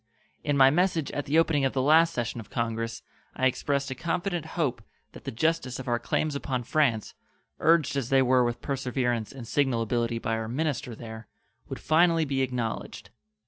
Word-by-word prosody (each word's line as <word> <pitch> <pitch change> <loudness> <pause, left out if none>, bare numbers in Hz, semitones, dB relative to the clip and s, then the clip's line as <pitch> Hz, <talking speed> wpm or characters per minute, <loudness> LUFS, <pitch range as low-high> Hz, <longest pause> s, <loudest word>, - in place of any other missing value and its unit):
In 145 -1 0
my 135 0 +7
message 170 -2 +1
at 145 - -4
the 150 +3 +2
opening 160 -3 +3
of 135 - +1
the 135 - 0
last 160 +3 +5
session 120 -4 -3
of 110 - -10
Congress 115 -1 -3 0.3
I 130 - 0
expressed 140 +1 0
a - - 0
confident 170 +3 -2
hope 150 -7 0 0.3
that - - -13
the - - -3
justice 145 0 0
of 130 - -8
our 120 -1 +1
claims 150 +5 -1
upon 130 -3 -2
France, 125 -4 +1 0.5
urged 165 -4 +3
as 135 -3 -2
they 135 -1 +4
were 130 0 +4
with 120 -1 -2
perseverance 125 -4 -1
and 130 -4 -9
signal 130 -5 +1
ability 115 +1 -1
by 115 0 -2
our 110 0 -4
minister 130 -2 -2
there, 110 -1 -9 0.4
would - - -5
finally 165 +1 +3
be 135 -2 -1
acknowledged. 125 -3 -3
135 Hz, 185 wpm, -27 LUFS, 120-155 Hz, 0.5 s, my